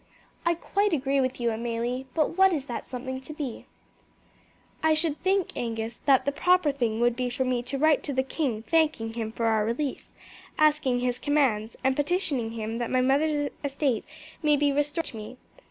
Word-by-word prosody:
"I 340 - +3
quite 400 +3 0
agree 275 -1 +1
with 255 0 -1
you, 235 -1 +1
Amelie; 235 +3 -3
but 320 +1 +1
what 385 +1 +6
is 295 -6 -1
that 240 - -5
something 260 +1 -5
to 285 +4 -9
be?" 285 -6 -6 1.1
"I 315 0 +4
should 310 -1 -1
think, 380 0 +1
Angus, 225 -1 -3
that 270 -2 +5
the 280 - +2
proper 360 +1 +3
thing 235 -5 -1
would 240 0 +3
be 250 0 -1
for 260 +2 -1
me 250 -1 0
to 250 +3 -4
write 310 +1 +4
to 285 - -2
the 260 0 +1
king 260 -5 -2
thanking 305 -8 +1
him 225 -1 -3
for 230 +1 -2
our 220 -1 +3
release, 250 +5 -3 0.5
asking 300 -5 +3
his 250 0 -1
commands, 255 -7 +1
and 265 0 +2
petitioning 290 -7 0
him 225 0 -4
that 240 - -2
my 255 - +2
mother's 290 +2 +2
estates 275 -4 -1 0.3
may 300 -2 +4
be 290 0 +2
restored 295 +3 0
to 225 - -7
me. 215 +4 -8
265 Hz, 190 wpm, -27 LUFS, 240-300 Hz, 1.1 s, what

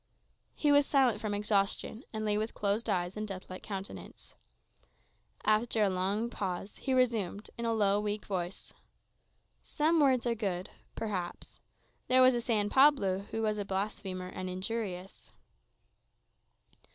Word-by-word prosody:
He 295 - +2
was 285 -1 +5
silent 255 -7 +3
from 210 -2 -1
exhaustion, 205 +2 0
and 215 -1 -3
lay 210 -1 +2
with 215 +2 -2
closed 205 +3 0
eyes 180 -2 0
and 215 0 -3
deathlike 185 -1 -7
countenance. 195 -1 -8 1.1
After 215 +1 +3
a 200 - +3
long 200 +6 -1
pause, 195 -1 -4
he 270 - -3
resumed, 225 -6 +1
in 235 - -4
a 230 - +1
low, 205 -1 +3
weak 210 0 -3
voice, 185 -2 -4 0.9
"Some 320 +2 +2
words 260 -4 +4
are 240 - +2
good 190 -5 -3 0.2
perhaps. 185 -6 -4 0.5
There 255 0 +6
was 250 -2 +4
San 215 -4 +1
Pablo, 205 -8 +4
who 225 - -2
was 215 -1 0
a - - -1
blasphemer, 190 -2 -3
and 185 0 -5
injurious." 190 -1 -5
210 Hz, 140 wpm, -31 LUFS, 195-230 Hz, 1.1 s, There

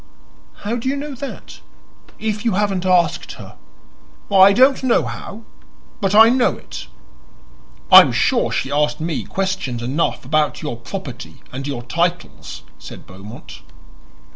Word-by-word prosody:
"How 230 +3 -1
do 245 +2 -3
you 275 - -1
know 285 +1 -6
that, 270 +1 -9 0.6
if 215 -1 -3
you 230 - 0
haven't 195 -2 -1
asked 180 -2 +1
her?" - - -12 0.8
"I 195 0 +7
don't 260 +6 +4
know 245 -10 +2
how; 120 - -8 0.6
but 195 0 0
I 225 +1 +8
know 250 0 +1
it." - - -10 1.0
"I - - +12
am - - 0
sure - - +1
she - - -2
asked 150 +1 0
me 160 0 -3
questions 190 -11 -3
enough 135 +2 -2
about 155 +3 0
your 150 -5 -4
property 130 +1 -9
and 135 +2 -6
your 130 -4 -5
titles," 170 - -3 0.2
said - - -11
Beaumont. 100 +5 -12
180 Hz, 140 wpm, -19 LUFS, 135-215 Hz, 1.0 s, I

